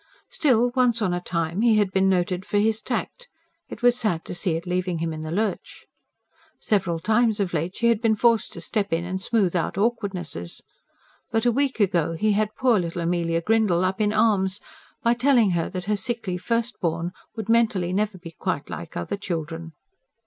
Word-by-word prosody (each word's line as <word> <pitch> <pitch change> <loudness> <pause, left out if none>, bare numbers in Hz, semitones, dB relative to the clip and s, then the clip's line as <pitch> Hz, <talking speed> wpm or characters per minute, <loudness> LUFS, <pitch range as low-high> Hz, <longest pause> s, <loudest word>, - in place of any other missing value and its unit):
Still, 245 -5 +3
once 245 -3 +3
on 190 -5 +1
a 175 - -2
time 170 +2 -2
he 230 -2 +4
had 205 -3 +2
been 190 0 +3
noted 180 0 0
for 205 - -1
his 220 +1 +2
tact; 485 - -4 0.4
it - - -9
was 245 0 +5
sad 200 -9 -1
to - - -6
see 175 -1 -1
it 165 +2 -4
leaving 180 -1 -1
him 165 0 -2
in 155 - -6
the 155 - -5
lurch. 210 +6 -3 0.7
Several 190 -6 0
times 220 +3 +2
of 190 -3 -1
late 170 +3 -2
she 235 - -2
had 230 -2 +2
been 225 -2 +3
forced 230 0 +2
to - - -8
step 205 -3 -2
in 165 +1 0
and 185 +1 -4
smooth 200 -4 +1
out 175 +1 -1
awkwardnesses. 195 - -2 0.7
But 225 +1 0
a 240 - +5
week 270 0 0
ago 175 -5 +2
he 215 +6 +1
had 210 +1 +2
had 215 - -31
poor 245 -5 +3
little 170 0 -3
Amelia 170 -1 0
Grindle 210 -4 +2
up 190 +3 -1
in 210 -1 +2
arms, 205 -3 +2 0.4
by 235 0 +4
telling 240 -4 +3
her 170 -2 0
that 180 -1 -5
her 210 +1 +1
sickly 205 -2 -3
first 230 +6 -2
born 170 0 -1 0.2
would 220 -3 -5
mentally 215 -6 +2
never 210 0 0
be 170 -2 -10
quite - - -3
like - - -7
other 85 - -3
children. 165 -3 -5
195 Hz, 200 wpm, -24 LUFS, 175-225 Hz, 0.7 s, was